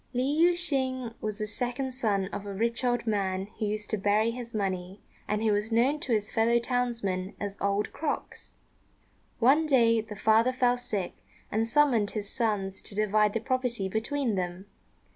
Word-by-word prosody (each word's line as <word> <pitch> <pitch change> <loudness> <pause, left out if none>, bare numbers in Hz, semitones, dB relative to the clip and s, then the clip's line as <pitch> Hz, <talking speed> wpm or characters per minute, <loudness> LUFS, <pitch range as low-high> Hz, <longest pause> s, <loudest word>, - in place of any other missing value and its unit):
Li 250 +1 +1
Yüeh 320 +6 +4
shêng 260 -8 -1
was 215 -1 -3
the 215 - -2
second 245 +4 -2
son 215 -7 0
of 200 - -5
a 200 -1 -6
rich 230 +4 -1
old 245 -2 +1
man 195 -3 0
who 215 - 0
used 210 0 -2
to 215 - 0
bury 210 +3 +2
his 240 0 -7
money, 190 -3 -3 0.3
and 210 +1 -1
who 220 - +3
was 210 +2 0
known 255 +6 +3
to 270 - -4
his 210 -2 0
fellow 230 +1 +3
townsmen 235 -6 -1
as 200 -1 -4
"Old 200 +1 0
Crocks." 310 - -4 0.8
One 285 +7 +4
day 230 -5 +4
the 215 -1 -9
father 220 +4 +4
fell 245 -1 +2
sick, 205 -6 -2 0.4
and 225 +2 +1
summoned 240 -5 +3
his 205 -1 -2
sons 205 -5 -1
to 200 - -8
divide 210 0 +2
the 225 - 0
property 250 -5 -1
between 230 +5 -1
them. 180 0 -3
225 Hz, 180 wpm, -28 LUFS, 205-250 Hz, 0.8 s, Yüeh